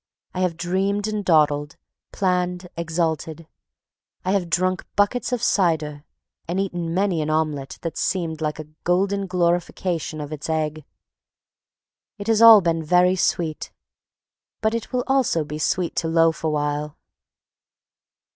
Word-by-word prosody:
I 185 - -4
have 180 -3 0
dreamed 195 +4 -1
and 215 -1 -2
dawdled, 150 -4 +2 0.4
planned, 180 -1 -1
exulted. 165 -1 -2 0.8
I 185 - +1
have 190 -4 0
drunk 185 +2 0
buckets 205 +5 +1
of 245 -2 -1
cider, 155 -8 +1 0.4
and 175 +3 -1
eaten 175 -4 -2
many 190 -4 +1
an 150 - -2
omelette 155 -3 -1
that 165 -2 -4
seemed 165 -4 -1
like 150 -1 -2
a 155 - -7 0.2
golden 195 +2 +1
glorification 175 -2 -1
of 150 +1 -6
its 150 +1 -6
egg. 155 -1 -2 1.3
It 205 - -7
has 225 0 +2
all 225 -2 +10
been 165 -2 0
very 180 +3 +4
sweet, 165 -3 -1 0.9
but 220 0 0
it 230 -1 -4
will 250 -1 0
also 265 -12 +2
be 150 +1 -6
sweet 170 +3 -1
to 165 - 0
loaf 165 -1 +2
awhile. 150 -1 -1
170 Hz, 135 wpm, -23 LUFS, 155-190 Hz, 1.3 s, all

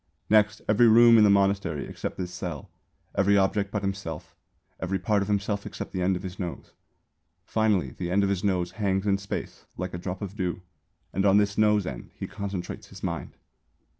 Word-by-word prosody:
Next, 105 -1 +4
every 110 +3 +5
room 115 +1 +8
in - - +7
the 105 - +6
monastery 100 -6 +2
except - - -6
this 90 -1 -4
cell, 85 -5 -6 0.4
every 100 +1 +3
object 100 +1 +1
but 100 0 -3
himself, 95 -6 -5 0.4
every 95 +1 -1
part 100 +3 +1
of 100 - -2
himself 100 0 -1
except - - -7
the 95 - -3
end 95 +1 +2
of 90 - -5
his 95 0 -7
nose. 90 -3 -5 0.7
Finally 110 -4 +1
the 90 -2 -5
end 100 +3 +2
of 100 - +1
his 95 -2 -1
nose 90 -3 0
hangs 95 -1 -1
in 100 -1 +2
space 100 - -6
like 90 0 -4
a 90 - -4
drop 90 +2 -5
of 100 0 -6
dew 90 -3 -3 0.5
and 95 - 0
on 100 0 +5
this 100 -1 +2
nose 105 -2 +3
end 65 -6 -6
he - - -5
concentrates 100 -3 -5
his - - -13
mind. - - -4
100 Hz, 195 wpm, -27 LUFS, 90-105 Hz, 0.7 s, room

